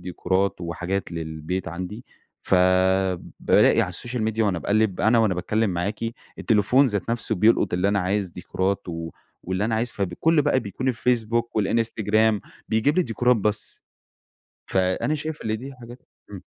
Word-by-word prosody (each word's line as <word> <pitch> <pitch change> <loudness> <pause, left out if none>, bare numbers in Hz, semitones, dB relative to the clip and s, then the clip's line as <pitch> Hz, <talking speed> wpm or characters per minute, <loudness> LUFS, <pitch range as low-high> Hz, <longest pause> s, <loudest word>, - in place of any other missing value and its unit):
ديكورات، 95 +2 -1
وحاجات 90 +2 -3
للبيت 80 +2 -4
عندي، 90 +7 -6 0.4
فبالاقي 95 0 +2
على - - 0
السوشيال 120 -1 -3
ميديا 110 0 0
وأنا 95 -4 0
باقلّب، 100 +2 +1
أنا 110 +3 +4
وأنا 110 -4 +3
باتكلّم 105 +4 0
معاكِ، 90 +4 -3 0.4
التليفون 115 +5 +3
ذات 105 -2 -2
نفسه 115 -1 -1
بيلقُط 105 -1 +3
اللي 90 +2 +1
أنا 100 0 +1
عايز 100 +1 0
ديكورات، 95 +2 -2
و 80 -1 -5 0.3
واللي 95 +3 -2
أنا 110 +1 0
عايز 120 +2 -1
فبكل 110 - +1
بقى 140 -2 +2
بيكون 125 +4 -4
الفيسبوك، 120 -1 0
والإنستجرام، 110 0 +1 0.3
بيجيب 110 +8 +2
لي 185 - +4
ديكورات 120 - +2
بس. 105 0 -2 0.8
فأنا 95 +10 0
شايف 155 0 -5
اللي 110 0 -1
دي 135 +5 -8
حاجات 120 +1 -11 0.3
إمم. - - -9
105 Hz, 150 wpm, -24 LUFS, 95-115 Hz, 0.8 s, أنا